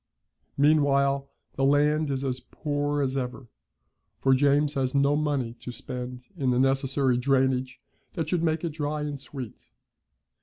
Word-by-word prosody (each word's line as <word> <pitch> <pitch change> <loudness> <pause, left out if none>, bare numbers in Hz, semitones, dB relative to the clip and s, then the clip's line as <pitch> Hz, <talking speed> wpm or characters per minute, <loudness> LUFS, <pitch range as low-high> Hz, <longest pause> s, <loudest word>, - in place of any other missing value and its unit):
Meanwhile, 140 -2 +3 0.3
the 135 - +1
land 150 +2 +3
is 135 -1 -2
as 130 -2 -2
poor 145 -1 -2
as 130 0 -1
ever, 130 0 -4 0.7
for 135 - +3
James 145 +2 +3
has 130 -1 -1
no 140 +1 +3
money 145 -6 -1
to 125 +1 -7
spend 125 0 -6
in 135 -6 0
the 125 - +2
necessary 135 -1 +2
drainage 130 0 +1 0.4
that 165 -2 -2
should 175 +1 0
make 160 -1 0
it 170 - 0
dry 150 0 -3
and 145 -1 -4
sweet. 130 -3 -9
140 Hz, 150 wpm, -27 LUFS, 130-145 Hz, 0.7 s, Meanwhile